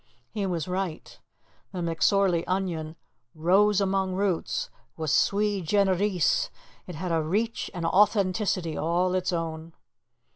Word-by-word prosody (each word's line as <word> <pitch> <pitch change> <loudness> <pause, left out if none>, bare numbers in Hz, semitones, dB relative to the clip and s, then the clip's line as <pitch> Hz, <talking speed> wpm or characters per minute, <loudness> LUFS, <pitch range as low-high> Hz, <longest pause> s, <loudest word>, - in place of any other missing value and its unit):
He 205 -3 -2
was 170 -3 -2
right. 185 -3 -4 0.5
The - - -6
McSorley 170 +1 +2
onion 170 -4 -2 0.4
"rose 195 +6 +3
among 190 -1 0
roots" 190 -3 -1 0.3
was 160 -3 -2
sui 205 +1 +2
generis. 190 -1 +1 0.4
It 180 - -7
had 180 +3 -4
a 165 -1 +2
reach 210 +9 -1
and 175 -3 -4
authenticity 190 -3 +2
all 175 +3 0
its 185 0 0
own. 165 -1 -4
185 Hz, 120 wpm, -26 LUFS, 165-200 Hz, 0.5 s, rose